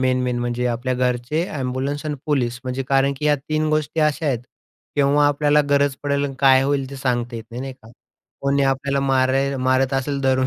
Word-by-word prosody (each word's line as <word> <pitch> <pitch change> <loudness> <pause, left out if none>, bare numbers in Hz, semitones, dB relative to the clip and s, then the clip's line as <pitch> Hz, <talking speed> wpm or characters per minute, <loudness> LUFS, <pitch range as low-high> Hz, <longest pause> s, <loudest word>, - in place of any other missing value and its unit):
Main 130 -1 +2
main, 125 -1 -1
म्हणजे 120 0 -1
आपल्या 125 +2 -1
घरचे, 125 +5 0 0.2
एम्ब्युलन्स 135 +3 -3
आणि 150 - -2
पोलीस 125 -5 0
म्हणजे 130 +1 -2
कारण 135 0 +3
की 150 - -5
या 150 - +4
3 155 +2 -2
गोष्टी 155 +1 0
अशा 150 +1 +1
आहेत 130 -5 +1 0.6
केव्हा 145 +1 +4
आपल्याला 145 +1 +3
गरज 140 -1 +3
पडेल 140 0 0
आणि 135 - -4
काय 135 -1 +5
होईल 135 -1 0
ते 140 - -7
सांगता 120 -2 -1
येत 115 - -7
नाही, 120 +2 -6
नाही 135 0 -5
का. 125 -4 -18 0.5
कोणी 140 0 +1
आपल्याला 140 +1 0
मार 130 -1 +2 0.3
मारत 130 +1 +1
असेल 140 +1 -1
धरून, 130 -1 +2
135 Hz, 200 wpm, -21 LUFS, 130-145 Hz, 0.6 s, काय